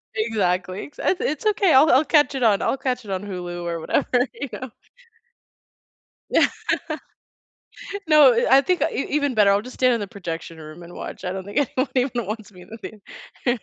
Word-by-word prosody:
Exactly, 190 -4 -1
ex 290 - -17
"It 375 - +1
it's 300 +5 -2
okay, 400 -4 +3
I'll 280 +4 +6
I'll 270 +5 +5
catch 295 -4 +3
it 260 - -1
on 210 -4 +3
I'll - - 0
catch 255 -3 -3
it 200 - -7
on 190 0 -3
Hulu 175 -3 -6
or” 170 -1 -3
“whatever," 250 - 0 0.2
you 255 +4 -6
know. 260 - -6 1.6
Yeah. - - +4 1.6
No, 295 -5 +7
i 235 +1 +1
"I - - +5
think 360 +4 0
e - - -2
even 285 -2 0
better, 210 -3 +5
I'll 200 +1 +2
just 250 +3 -10
stand 255 -1 +3
in 230 - 0
the 205 - -4
projection 170 -5 -7
room 155 +2 -11
and 175 +1 -12
watch," - - -8
I 180 - -2
don't 190 0 -5
think 200 +2 -8
anyone 260 -1 0
even 250 -3 0
wants 215 +1 -6
me 180 -2 -15
in 180 - -16
the 225 - -9 0.7
thea 245 0 +2
230 Hz, 205 wpm, -22 LUFS, 190-265 Hz, 1.6 s, No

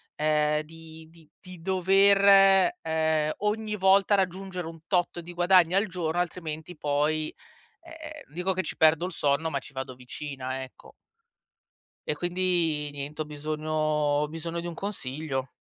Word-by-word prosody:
ehm, 150 0 +1
di 160 0 -13
di 165 -2 -20
di 185 -3 -12
dover, 195 - +5
ehm, 160 -1 0
ogni 210 0 -1
volta 195 +1 +4
raggiungere 190 -1 -2
un 165 0 -9
tot 175 -2 0
di 175 +1 -9
guadagno 180 0 +4
al 200 - +3
giorno 175 -3 -2
altrimenti 165 -1 -4
poi, 150 +1 0 0.5
ehm, 335 0 -14 0.3
non - - -23
dico 180 +3 0
che 185 0 -1
ci - - -5
perdo 160 +2 +4
il 185 - -6
sonno, 145 +1 0
ma 140 - -1
ci 140 - -13
vado 130 -1 -6
vicina, 130 +1 -6
ecco. 130 - -16 1.2
E, - - +1
quindi, 175 -3 0
niente 145 +2 -6
ho - - -7
bisogno 155 +1 -5
ho 150 -1 +1
bisogno 165 +2 -4
di 170 - -5
un 170 - -6
consiglio. 145 -7 -4
165 Hz, 155 wpm, -27 LUFS, 150-185 Hz, 1.2 s, dover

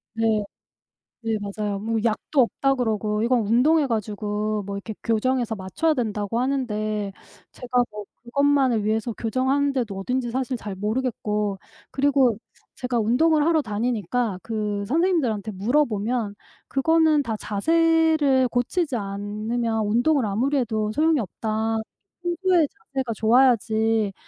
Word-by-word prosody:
네. 220 -2 +1 0.8
네. 225 -1 0
맞아요. 205 0 -3
뭐 225 +2 -1
약도 230 +5 +1
없다 270 +3 +1
그러고 215 -3 -1
이건 240 +1 +2
운동해 280 +7 +4
가지고 210 -1 -2
뭐 200 0 -4
이렇게 215 +2 -6
교정해서 235 +1 0
맞춰야 210 - 0
된다고 220 -3 -2
하는데 215 -6 -1 0.4
제가 250 0 0
뭐 210 -1 -7 0.2
그것만을 270 -3 +2
위해서 220 +2 0
교정하는 260 +6 0
데도 230 -8 -2
어딘지 250 +4 -2
사실 260 +1 -2
잘 205 -4 -6
모르겠고. 210 -2 -2 0.3
그리고 270 -5 +3 0.4
제가 250 -2 -2
운동을 295 +8 +3
하러 325 -1 +3
다니니까 220 -1 -1
그 210 -2 -2
선생님들한테 270 - +1
물어보면 225 0 0 0.3
"그거는 315 +2 +3
다 225 -5 -3
자세를 315 +3 +2
고치지 255 +5 -1
않으면 215 +3 -2
운동을 245 +5 +2
아무리 245 +8 0
해도 220 -4 -1
소용이 310 +1 +2
없다. 220 +2 -2 0.5
평소에 350 -1 +2 0.3
자세가 260 -4 -1
좋아야지 225 -2 +3
230 Hz, 310 characters per minute, -24 LUFS, 210-270 Hz, 0.8 s, 운동해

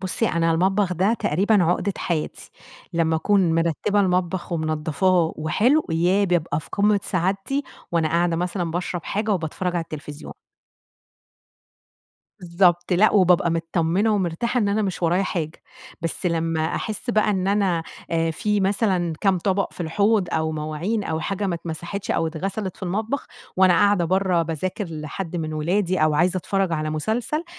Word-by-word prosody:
بُصّي، 190 +3 -1
أنا 165 0 +1
المطبخ 190 +3 +1
ده 190 +6 +2
تقريبًا 200 +3 +2
عُقدة 180 +3 +1
حياتي 160 -3 -3 0.4
لمّا 165 -1 +1
أكون 180 0 +2
مرتّبة 170 +5 +1
المطبخ، 180 -1 0
ومنضّفاه 160 +2 +1
وحلو 240 - +2
ياه! 175 +5 +2
بابقى 170 -5 0
في - - -15
قمة 205 0 +3
سعادتي، 195 +10 -1 0.3
وأنا 165 -2 +2
قاعدة 170 +1 +1
مثلًا 175 0 -2
باشرب 175 0 -3
حاجة 215 +2 -2
وباتفرّج 180 +1 -3
على 170 - 0
التلفزيون. 150 -2 -8 2.1
بالضبط، 175 0 +2
لأ 200 +5 +4
وبابقى 180 -4 +4
متطمّنة 165 +5 +1
ومرتاحة 200 +6 -1
إن 205 - +1
أنا 210 +2 +1
مش 190 -3 -3
ورايا 175 +3 +2
حاجة، 165 -4 -4 0.4
بس 165 +2 -2
لمّا 165 -2 0
أحسّ 220 +3 -3
بقى 215 -2 +2
إن 190 -2 0
أنا 195 -5 +1 0.3
آآ 165 -1 +1
في 210 +6 0
مثلًا 190 -3 +1
كام 195 -3 +2
طبق 195 +2 0
في - - -12
الحوض، 200 +4 +1
أو 160 0 0
مواعين 155 +8 -2
أو 160 -3 -2
حاجة 200 +3 -2
ما 180 - -1
اتمسحتش، 170 +4 -5
أو 165 - +1
اتغسلت 190 +4 -4
في - - -21
المطبخ، 215 +9 -2 0.3
وأنا 185 -1 +5
قاعدة 200 0 +3
برّه، 185 0 +2
باذاكر 170 +5 -3
لحد 160 +3 -5
من 155 -2 -3
ولادي 180 +4 0
أو 155 -1 +3
عايزة 175 +4 +2
أتفرّج 190 0 -1
على 155 -1 -1
مسلسل، 220 - -2
180 Hz, 155 wpm, -23 LUFS, 165-200 Hz, 2.1 s, وأنا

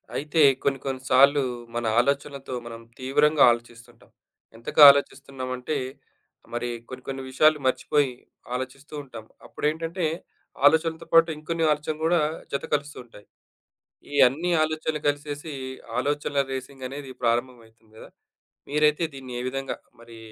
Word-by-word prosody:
అయితే, 150 +2 0 0.2
కొన్ని 135 -1 0
కొన్ని 130 -1 -3
సార్లు 140 +2 +6 0.3
మన 120 0 -2
ఆలోచనలతో 140 0 -1
మనం 115 -1 -8 0.2
తీవ్రంగా 145 +3 +3
ఆలోచిస్తుంటాం. 120 0 -8 0.5
ఎంతగా 115 +6 +4
ఆలోచిస్తున్నాం 135 -2 -4
అంటే, 125 +5 -4 0.8
మరి 120 +1 -2 0.2
కొన్ని 130 0 -9
కొన్ని 135 0 -5
విషయాలు 155 +3 +4
మర్చిపోయి 135 +1 +1 0.4
ఆలోచిస్తూ 130 +3 -7
ఉంటాం. 120 -5 -11 0.2
అప్పుడేంటంటే, 165 +3 -2 0.6
ఆలోచనలతో 160 +2 +1
పాటు 165 0 +6
ఇంకొన్ని 165 +1 -2
ఆలోచనలు 150 +1 -2
గూడా 170 0 +3 0.3
జత 140 - -2
కలుస్తూ 145 0 -5
ఉంటాయి. 105 -3 -17 0.9
ఈ - - -3
అన్ని 160 +8 -2
ఆలోచనలు 155 -1 -2
కలిసేసి, 145 +1 -5 0.5
ఆలోచనల 145 +1 0
రేసింగ్ 130 0 -7
అనేది 135 0 -8
ప్రారంభం 120 +1 0
అయితుంది 110 -1 -28
గదా! - - -12 0.6
మీరైతే 150 +2 +2
దీన్ని 130 -2 -9
ఏ - - -3
విధంగా 135 +1 -4 0.3
మరి 115 -1 -14
140 Hz, 125 wpm, -25 LUFS, 130-150 Hz, 0.9 s, సార్లు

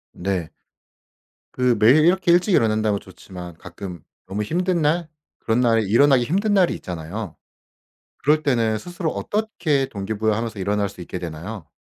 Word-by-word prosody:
네. 90 -3 -2 1.0
그 125 -1 +2
매일 130 +9 +6
이렇게 175 0 +3
일찍 180 +3 +3
일어난다면 110 -4 +2
좋지만 90 -2 -11
가끔 90 -3 -9 0.3
너무 100 +3 -2
힘든 175 - 0
날 160 +3 +1 0.3
그런 115 +2 +1
날에 115 -2 +3
일어나기 125 +5 +4
힘든 200 - 0
날이 185 -3 +4
있잖아요. 90 +2 -6 0.8
그럴 155 +2 +2
때는 115 -6 +1
스스로 175 - -4
어떻게 180 -10 -1
동기부여하면서 110 +2 -2
일어날 100 +1 0
수 100 - -13
있게 90 +1 -6
되나요? 85 +1 -7
110 Hz, 335 characters per minute, -22 LUFS, 100-155 Hz, 1.0 s, 매일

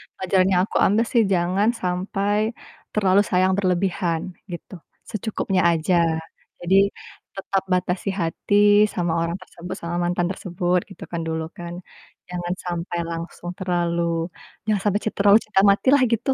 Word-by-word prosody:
pelajaran 185 0 +2
yang 180 - +4
aku - - -2
ambil 220 +4 +2
sih, 235 - +4
jangan 185 +4 +2
sampai 200 +4 0 0.4
terlalu 200 -2 +4
sayang 185 +1 +3
berlebihan, 180 -3 0 0.3
gitu. 175 +2 -8 0.4
Secukupnya 210 -3 -1
aja. 165 +2 +1 0.7
Jadi 175 +2 +2 0.6
tetap 195 0 -1
batasi 180 +2 -1
hati 165 +5 -1 0.4
sama 175 -2 -1
orang 170 +1 -1
tersebut, 180 0 -8
sama 170 +1 -4
mantan 175 0 0
tersebut, 180 -2 -1
gitu 195 - -11
kan 170 -1 -2
dulu 160 0 -2
kan. 175 0 -6 0.6
Jangan 175 0 -3
sampai 175 0 -3
langsung 170 +1 -6
terlalu 175 -2 0 0.6
jangan 210 -3 +1
sampai 205 0 +2
cin 215 - -2
terlalu 200 +1 +6
cinta 205 -3 +2
matilah, 260 +7 +4
gitu. 230 +4 0
185 Hz, 140 wpm, -23 LUFS, 175-200 Hz, 0.7 s, terlalu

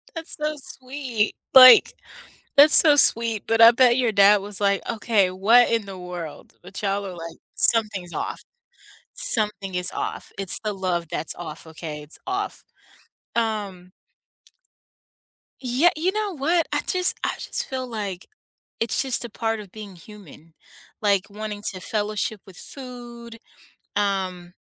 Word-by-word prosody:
That's 330 0 -7
so 305 0 -3
sweet 255 -5 -4 0.2
like, 255 -1 +9 0.6
that's 295 +2 +8
so, 300 -3 +9
sweet, 230 -5 +5
but, 225 0 0
I 230 0 +9
bet 245 0 +3
your 245 -3 +1
dad 200 0 +4
was 205 0 -8
like, 200 -1 0
"Okay, 215 -4 0
what 220 +7 +3
in 225 -3 -1
the 195 -1 -9
world." 180 -3 -9
but 190 +2 -9
y'all 200 0 -2
are 185 - -8
like, 165 -1 -10 0.2
something's 205 -6 +1
off - - -5 0.7
something 210 -4 +1
is 180 0 -1
off. - - -6
It's 195 -2 0
the 215 -2 -3
love 180 -3 -3
that's 155 - -4
off, 160 -1 -10
okay, 155 -1 -8
it's 150 - -10
off, 390 +2 -4 0.7
um 205 -6 -3 1.7
Yeah 260 +7 +2
you 360 +4 -1
know 420 -4 -4
what, 330 +5 0
I - - 0
just 365 -1 0
I - - 0
just - - -4
feel 260 -1 -5
like, 200 -5 -6 0.5
it's 225 -2 -1
just 260 -3 +1
a 240 - -8
part 225 +1 -3
of 200 -3 -12
being 205 -4 -11
human, 165 -4 -16 0.5
like, 200 -1 0
wanting 210 0 -7
to 185 - -10
fellowship 210 0 -3
with 185 -3 -13
food 240 -3 -10 0.6
um, 185 -3 -3
210 Hz, 150 wpm, -22 LUFS, 190-245 Hz, 1.7 s, like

